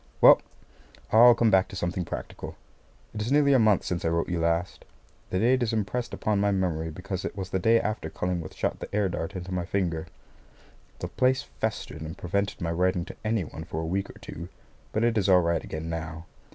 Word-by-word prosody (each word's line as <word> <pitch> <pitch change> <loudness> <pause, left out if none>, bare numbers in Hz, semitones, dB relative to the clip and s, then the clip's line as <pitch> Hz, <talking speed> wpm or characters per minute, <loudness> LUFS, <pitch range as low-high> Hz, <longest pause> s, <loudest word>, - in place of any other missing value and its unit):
Well, - - +8 0.7
now, 115 +2 +9
I'll 120 - +8
come 115 -2 +3
back 95 0 +4
to 95 - -10
something 90 0 -2
practical. - - -6 0.6
It 105 - -4
is 115 +4 -2
nearly 145 -1 +5
a 130 - +6
month 110 -3 +4
since 90 -1 -2
I - - +1
wrote 85 0 +1
to - - -7
you 85 - 0
last. 85 +2 0 0.5
The 90 - -1
date 125 +6 +3
is 115 -1 0
impressed 115 +3 -1
upon 105 -2 0
my 100 0 +2
memory 90 -5 0
because 95 +3 -5
it - - -5
was 95 -2 -5
the 95 - +1
day 115 +5 +4
after 105 -8 -3
Cullingworth 85 -2 -3
shot - - -1
the - - -6
air 105 -2 +2
dart 85 +1 -4
into 90 0 -5
my 90 -1 -1
finger. 85 -3 -1 0.9
The - - -4
place 130 +1 +2
festered 70 +2 -4
and 80 +3 -6
prevented 100 +3 -2
my 85 -1 -1
writing 90 +1 +1
to - - -9
any 110 -2 +1
one 80 +1 -8
for 80 -1 -5
a 80 - -2
week 95 +4 -1
or - - -12
two, 85 +3 -8 0.4
but 110 - 0
it 115 -2 +3
is 100 -1 +1
all 90 -1 +7
right 85 -1 0
again 80 +1 -5
now. 80 0 -5
95 Hz, 225 wpm, -27 LUFS, 85-105 Hz, 0.9 s, now